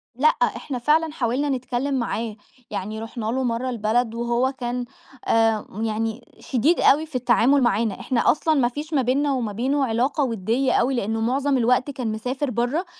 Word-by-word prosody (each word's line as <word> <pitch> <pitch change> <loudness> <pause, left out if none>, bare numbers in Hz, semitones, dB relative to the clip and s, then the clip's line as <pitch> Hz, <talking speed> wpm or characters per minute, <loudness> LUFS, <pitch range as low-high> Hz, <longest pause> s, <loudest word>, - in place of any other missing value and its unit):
لأ، 280 +5 +3
إحنا 280 -3 0
فعلًا 310 +4 +2
حاولنا 265 +1 -1
نتكلَّم 260 +1 -2
معاه، 230 -3 -2 0.4
يعني 210 +2 -4
رُحنا 225 0 -6
له 255 +4 -1
مرَّة 245 +1 -1
البلد، 230 0 0
وهو 240 +2 0
كان 245 -2 -4 0.4
آآ، 225 -2 +2 0.2
يعني 225 +2 -2
شديد 280 +7 +1
أوي 305 +3 +4
في 310 - -14
التعامل 250 +2 +3
معانا. 220 -3 +1
إحنا 250 -3 +2
أصلًا 315 +1 +1
ما 265 -5 +3
فيش 295 +5 -6
ما 275 - +3
بيننا 275 +3 +1
وما 240 -5 -2
بينه 265 +6 0
علاقة 260 +5 0
ودِّيَّة 235 +3 0
أوي، 260 +3 +2
لأنه 225 -1 -1
معظَم 270 +4 +1
الوقت 250 +3 +2
كان 250 -5 -3
مسافر 255 +6 -3
برَّه. 245 - -1
245 Hz, 170 wpm, -23 LUFS, 230-275 Hz, 0.4 s, أوي